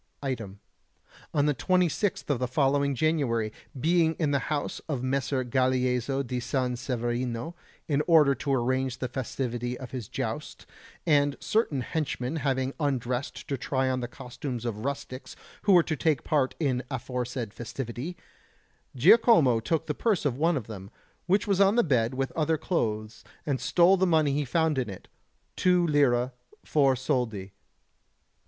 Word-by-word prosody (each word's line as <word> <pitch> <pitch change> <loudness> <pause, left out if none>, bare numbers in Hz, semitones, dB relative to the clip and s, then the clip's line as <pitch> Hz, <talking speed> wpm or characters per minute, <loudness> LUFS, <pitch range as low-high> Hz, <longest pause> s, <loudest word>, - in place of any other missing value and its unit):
Item: 110 -7 -4 0.7
on 145 -1 +2
the 150 - +3
26th 180 - 0
of 135 - 0
the 125 - 0
following 140 +1 +1
January, 120 -7 0 0.3
being 165 +2 +3
in 155 -4 0
the 140 - +2
house 150 -2 -2
of 135 -5 -2
Messer 130 0 0
Galeazzo 130 +1 +1
di 125 +1 -3
San 125 0 -1
Severino, 120 +3 -3 0.3
in 145 -1 +1
order 155 -5 +6
to 140 +2 -3
arrange 130 0 0
the 130 - -3
festivity 125 -1 -3
of 130 -3 -9
his 125 -6 -5
joust, - - -5 0.4
and 145 -3 +3
certain 185 - 0
henchmen 145 -1 -2
having 130 -2 -1
undressed 130 -3 -2
to 140 - -2
try 130 0 0
on 130 - -1
the 120 - -3
costumes 125 0 -6
of 110 -2 -3
rustics 140 -2 -5 0.3
who 200 - +5
were 175 -2 +7
to 160 - -2
take 155 -2 +1
part 140 -4 +1
in 140 -6 +1
the - - -8
aforesaid 125 -3 -4
festivity, 125 +7 -6 0.8
Giacomo 155 - +6
took 160 +7 -1
the 150 - -2
purse 205 -1 0
of 135 -4 +1
one 160 +3 +2
of 120 - -4
them, 100 -3 -9 0.4
which 195 +3 +3
was 200 -1 +2
on 200 +2 +5
the 240 - +4
bed 125 -5 +1
with 135 0 -1
other 160 0 0
clothes, 110 - -2 0.2
and 140 -3 -1
stole 180 +2 +4
the 190 +1 +2
money 155 -4 +3
he 145 +1 0
found 160 +1 +1
in 125 -4 -2
it 95 - -10 0.5
2 180 -1 +3
lire, 135 -5 +2 0.3
4 140 -3 +3
soldi. 120 -7 -2
135 Hz, 160 wpm, -27 LUFS, 125-155 Hz, 0.8 s, were